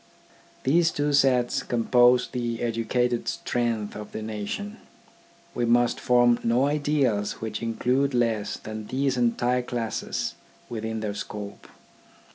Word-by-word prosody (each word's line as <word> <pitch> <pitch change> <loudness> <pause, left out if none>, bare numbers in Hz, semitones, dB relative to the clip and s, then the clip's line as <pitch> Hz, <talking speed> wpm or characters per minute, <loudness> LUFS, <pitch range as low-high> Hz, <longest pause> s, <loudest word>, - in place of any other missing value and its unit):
These 165 +5 +4
two 145 -2 -1
sets 135 -1 +3
compose 125 +1 +3
the 120 -2 -3
educated 120 +1 0
strength 115 -4 -2
of 105 0 -8
the 110 - -4
nation. 110 - -5 0.8
We 120 - -1
must 120 +1 +3
form 120 -1 +4
no 120 +3 +3
ideals 145 -8 +1
which 110 -1 -5
include 125 +4 0
less 115 -3 0
than 110 -1 -7
these 135 +1 0
entire 125 +1 +1
classes 120 -3 -3 0.4
within 110 -1 -4
their 105 -2 -2
scope. 100 0 -7
120 Hz, 120 wpm, -26 LUFS, 110-125 Hz, 0.8 s, These